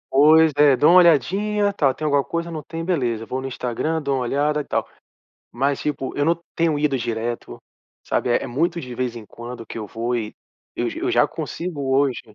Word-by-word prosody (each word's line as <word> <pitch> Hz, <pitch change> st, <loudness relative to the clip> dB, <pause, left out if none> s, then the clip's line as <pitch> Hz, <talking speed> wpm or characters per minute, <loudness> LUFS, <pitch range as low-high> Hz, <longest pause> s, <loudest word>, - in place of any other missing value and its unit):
Pois 155 Hz, +3 st, +6 dB
é. 145 Hz, -2 st, +6 dB
Dou 150 Hz, -, +5 dB
uma 180 Hz, -, +8 dB
olhadinha, 200 Hz, +5 st, +3 dB
tal. 145 Hz, -8 st, +2 dB
"Tem 155 Hz, -, -6 dB
alguma 145 Hz, -2 st, +2 dB
coisa? 170 Hz, +2 st, -4 dB
Não 155 Hz, -2 st, -5 dB
tem. 165 Hz, +3 st, -6 dB
Beleza". 120 Hz, -11 st, -1 dB
Vou 130 Hz, +3 st, -4 dB
no 135 Hz, -, -4 dB
Instagram, 130 Hz, +6 st, -2 dB
dou 140 Hz, -2 st, -1 dB
uma -, -, -1 dB
olhada 145 Hz, +4 st, 0 dB
e -, -, -7 dB
tal. -, -, -2 dB, 0.6 s
Mas, 135 Hz, +3 st, 0 dB
tipo, 135 Hz, -3 st, -3 dB
eu 145 Hz, -, +2 dB
não 165 Hz, +2 st, +1 dB, 0.2 s
tenho 165 Hz, -3 st, +1 dB
ido 145 Hz, -2 st, +1 dB
direto, 115 Hz, 0 st, -4 dB, 0.4 s
sabe. -, -, -1 dB
É -, -, +2 dB
é -, -, -7 dB
muito 170 Hz, +7 st, 0 dB
de 125 Hz, -5 st, -7 dB
vez 125 Hz, -1 st, -2 dB
em 110 Hz, -, -10 dB
quando 120 Hz, +1 st, -9 dB
que -, -, -8 dB
eu 110 Hz, -, -4 dB
vou 115 Hz, +4 st, -3 dB
e 110 Hz, -3 st, -4 dB, 0.4 s
eu -, -, 0 dB
eu -, -, -1 dB
já -, -, +4 dB
consigo 145 Hz, -6 st, -4 dB
hoje 135 Hz, -2 st, +2 dB
140 Hz, 215 wpm, -22 LUFS, 125-160 Hz, 0.6 s, uma